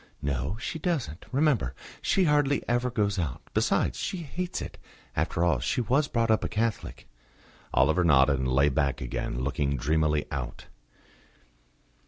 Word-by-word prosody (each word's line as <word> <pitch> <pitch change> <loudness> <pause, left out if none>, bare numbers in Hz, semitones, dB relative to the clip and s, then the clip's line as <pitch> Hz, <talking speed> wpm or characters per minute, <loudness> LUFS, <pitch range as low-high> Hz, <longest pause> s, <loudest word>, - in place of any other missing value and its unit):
"No, 70 - -1
she 160 - -4
doesn't. 140 - -2
Remember 130 - +1 0.3
she 195 - +2
hardly 145 -3 +2
ever 120 +1 +1
goes 105 -4 0
out. 75 -8 -3
Besides, - - +1
she 190 - -2
hates 180 +4 -4
it. - - -7 0.4
After 85 - 0
all, 80 -7 +3
she 65 - -1
was 130 +6 +2
brought 115 -3 +1
up 110 - +2
a - - -2
Catholic." 110 0 -2 0.6
Oliver 80 +8 +3
nodded, 70 -3 +4
and 65 - 0
lay 70 +3 +3
back 70 0 0
again, - - -3
looking 70 0 0
dreamily 75 +2 +1
out. 60 -4 -5
85 Hz, 150 wpm, -28 LUFS, -, 0.6 s, nodded